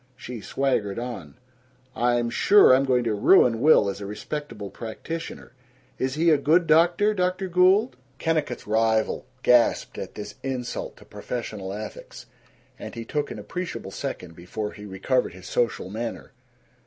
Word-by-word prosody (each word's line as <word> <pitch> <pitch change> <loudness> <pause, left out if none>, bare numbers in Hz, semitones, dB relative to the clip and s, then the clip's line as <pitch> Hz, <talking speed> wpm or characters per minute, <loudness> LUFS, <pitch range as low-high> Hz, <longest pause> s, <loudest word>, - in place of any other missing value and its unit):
She 125 -3 -8
swaggered 110 -6 -1
on: 115 - -6 0.6
"I'm 120 0 +1
sure 200 - +6
I'm 135 +1 +4
going 125 -2 +2
to 115 -2 0
ruin 115 +3 +4
Will 150 -8 +6
as 100 +1 -4
a 100 - -5
respectable 105 -1 -6
practitioner 160 +10 -7 0.5
Is 130 +1 -1
he 165 +2 +3
a 150 - +4
good 165 +5 +3
doctor, 175 +7 +4
Dr. 185 0 -1
Gould?" 185 +7 +3 0.2
Kennicott's 155 -6 -1
rival 110 +2 +1 0.2
gasped 120 -1 +3
at - - -7
this 105 0 -7
insult 130 -3 -4
to - - -16
professional 105 -6 -6
ethics, 100 - -8 0.5
and - - -8
he 115 -1 -6
took 150 +4 -2
an - - -7
appreciable 180 -1 -6
second 85 -2 -6
before 105 +5 -5
he 105 - -11
recovered 95 +3 0
his 95 - -13
social 115 -6 -1
manner. 115 +4 -6
120 Hz, 150 wpm, -25 LUFS, 105-155 Hz, 0.6 s, sure